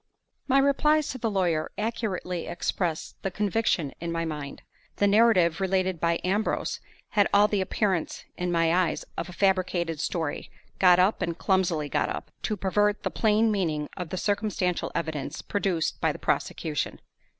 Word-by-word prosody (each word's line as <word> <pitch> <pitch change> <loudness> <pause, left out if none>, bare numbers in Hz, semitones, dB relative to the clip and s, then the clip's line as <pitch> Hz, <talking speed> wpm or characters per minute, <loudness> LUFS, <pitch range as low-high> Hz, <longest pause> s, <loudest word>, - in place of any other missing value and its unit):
MY 270 0 +4
replies 300 +2 +3
to 255 - -5
the 225 - 0
lawyer 175 -6 0
accurately 210 -6 -3
expressed 175 -2 -3
the 195 - -1
conviction 200 -6 0
in 170 0 -4
my 165 0 -1
mind. 150 -3 -6 0.3
The 205 - +2
narrative 200 -5 +4
related 190 -2 0
by 170 0 +1
Ambrose 205 +4 0 0.3
had 205 -2 +3
all 205 +1 +6
the 205 -2 0
appearance, 190 -2 -1
in 180 0 -2
my 165 -1 +2
eyes, 180 -2 +1
of 170 - -4
a - - -7
fabricated 180 -4 0
story, 160 -1 -3 0.3
got 180 -2 +7
up, 185 +4 +3
and 170 -2 -2
clumsily 175 -7 +1
got - - 0
up, - - -5
to 215 - -2
pervert 205 +2 +1
the - - -1
plain 220 0 +3
meaning 160 -7 -1
of 180 -3 -5
the 185 - -4
circumstantial 200 -3 -1
evidence 160 -4 -3
produced 190 -5 -1
by - - +3
the - - -7
prosecution. 155 -3 -2
185 Hz, 160 wpm, -27 LUFS, 170-205 Hz, 0.3 s, got